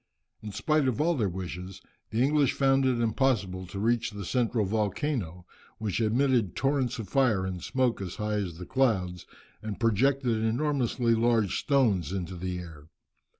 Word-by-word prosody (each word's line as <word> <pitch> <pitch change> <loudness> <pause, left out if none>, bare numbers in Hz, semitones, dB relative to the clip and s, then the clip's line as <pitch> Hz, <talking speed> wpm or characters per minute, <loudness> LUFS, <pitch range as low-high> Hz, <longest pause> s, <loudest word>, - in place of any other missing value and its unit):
In 110 - -6
spite 155 +5 +1
of 130 +1 -1
all 165 +3 +3
their 110 - 0
wishes, 90 +1 -6 0.3
the 115 +3 +1
English 145 -1 +3
found 135 -1 +3
it 125 -2 +1
impossible 110 -6 0
to 95 - -8
reach 115 +2 +1
the 100 -2 -7
central 115 -1 +1
volcano, 105 - -2 0.3
which 110 0 -2
emitted 115 -2 +2
torrents 135 -3 0
of 110 -4 -5
fire 110 -6 +2
and 90 -2 -4
smoke 130 -2 0
as 90 -3 -5
high 105 0 -2
as 90 -5 -3
the 90 - -7
clouds, 95 -10 0 0.3
and 110 -2 -5
projected 120 +2 +2
enormously 120 -1 +1
large 115 -4 +2
stones 110 - +2
into 95 -1 -4
the 90 +1 -4
air. 80 -4 -10
110 Hz, 160 wpm, -28 LUFS, 95-130 Hz, 0.3 s, all